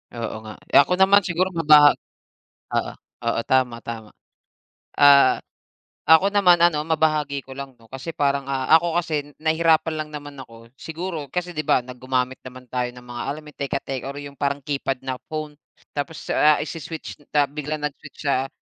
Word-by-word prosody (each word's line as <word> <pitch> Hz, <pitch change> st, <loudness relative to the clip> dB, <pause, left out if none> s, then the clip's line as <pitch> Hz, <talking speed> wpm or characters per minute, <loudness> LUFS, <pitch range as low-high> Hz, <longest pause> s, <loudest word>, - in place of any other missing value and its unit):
Oo 115 Hz, -2 st, -4 dB
nga, 110 Hz, -1 st, -8 dB, 0.2 s
eh, -, -, +7 dB
ako 145 Hz, +6 st, +4 dB
naman 190 Hz, +2 st, +6 dB
siguro 185 Hz, 0 st, -1 dB
maba 150 Hz, -3 st, +7 dB, 0.8 s
oo. -, -, 0 dB, 0.3 s
Oo, 115 Hz, 0 st, +1 dB
tama, 125 Hz, -3 st, +2 dB
tama. 110 Hz, -2 st, -7 dB, 0.9 s
Ah, 140 Hz, -2 st, +6 dB, 0.7 s
ako 160 Hz, +6 st, +6 dB
naman 180 Hz, -4 st, +5 dB
ano 170 Hz, -3 st, +3 dB
mabahagi 155 Hz, -3 st, 0 dB
ko 135 Hz, -, -10 dB
lang 135 Hz, -1 st, -8 dB
'no, 115 Hz, -, -20 dB
kasi 135 Hz, +5 st, -6 dB
parang, 140 Hz, -1 st, 0 dB
ah, 130 Hz, -1 st, -2 dB
ako 170 Hz, +1 st, 0 dB
kasi 150 Hz, -4 st, -3 dB
nahirapan 160 Hz, 0 st, +2 dB
lang 155 Hz, 0 st, -4 dB
naman 145 Hz, -1 st, -8 dB
ako 115 Hz, -1 st, -16 dB
siguro 160 Hz, 0 st, -6 dB
kasi 180 Hz, 0 st, -3 dB
'di 155 Hz, -, -2 dB
ba -, -, +4 dB
na 125 Hz, -, -8 dB
gumamit 130 Hz, 0 st, -2 dB
naman 130 Hz, 0 st, -10 dB
tayo 125 Hz, -1 st, -1 dB
ng 125 Hz, 0 st, -13 dB
mga, 120 Hz, -1 st, -7 dB
alam 155 Hz, +2 st, -7 dB
yung 150 Hz, -, -14 dB
teka-tek 135 Hz, -2 st, -3 dB
or 140 Hz, +1 st, -6 dB
yung 145 Hz, -1 st, -9 dB
parang 140 Hz, 0 st, 0 dB
keypad 135 Hz, -2 st, -2 dB
na 130 Hz, -1 st, -2 dB, 0.2 s
phone. 155 Hz, -1 st, -5 dB, 0.4 s
Tapos, 150 Hz, +3 st, -5 dB
ah, 150 Hz, 0 st, +4 dB
isi-switch, 160 Hz, 0 st, -7 dB, 0.2 s
ta 145 Hz, -1 st, +4 dB
biglang 150 Hz, +1 st, -4 dB
nag-switch 145 Hz, 0 st, -7 dB
sa, 135 Hz, -1 st, +1 dB
145 Hz, 175 wpm, -23 LUFS, 130-160 Hz, 0.9 s, eh